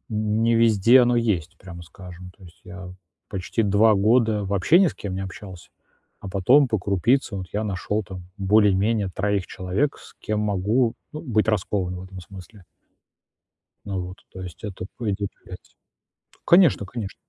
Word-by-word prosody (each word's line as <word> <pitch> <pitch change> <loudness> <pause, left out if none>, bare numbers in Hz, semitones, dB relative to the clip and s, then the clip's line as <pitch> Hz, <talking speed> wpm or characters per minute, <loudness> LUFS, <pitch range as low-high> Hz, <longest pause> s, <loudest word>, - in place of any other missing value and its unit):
н 110 0 -1
не 115 0 +3
везде 115 +2 +5
оно 120 0 +3
есть, 105 -9 -1
прямо 85 -2 -11
скажем. 90 +1 -12
То 95 - -17
есть 85 -1 -17
я 90 0 -9 0.4
почти 95 +4 -2
2 105 +2 +4
года 110 +1 +2
вообще 100 - +3
ни 195 - +5
с - - -2
кем 100 -3 -6
не 95 - -3
общался, 95 -1 -10 0.5
а 100 - -8
потом 125 +9 +4
по 110 - 0
крупице 100 +5 0
вот 95 -2 -5
я 105 +1 -2
нашёл 105 +1 -2
там 90 -1 -10
более-менее 105 +1 +2
3 100 -1 -1
человек, 95 +10 -2
с - - -16
кем 105 0 -2
могу, 105 +4 +1 0.2
ну, 155 - -7
быть 110 -7 0
раскованным 90 -3 -1
в - - -9
этом 95 0 -10
смысле. 95 +2 -13 1.2
Ну 100 -2 -3
вот. 90 +1 -7 0.2
То 95 - -9
есть 90 +3 -10
это 95 -3 -6
будет 105 -4 -2 0.2
влиять. - - -13 0.7
Конечно 170 - +5
конечно. 105 -1 -7
100 Hz, 165 wpm, -23 LUFS, 95-110 Hz, 1.2 s, везде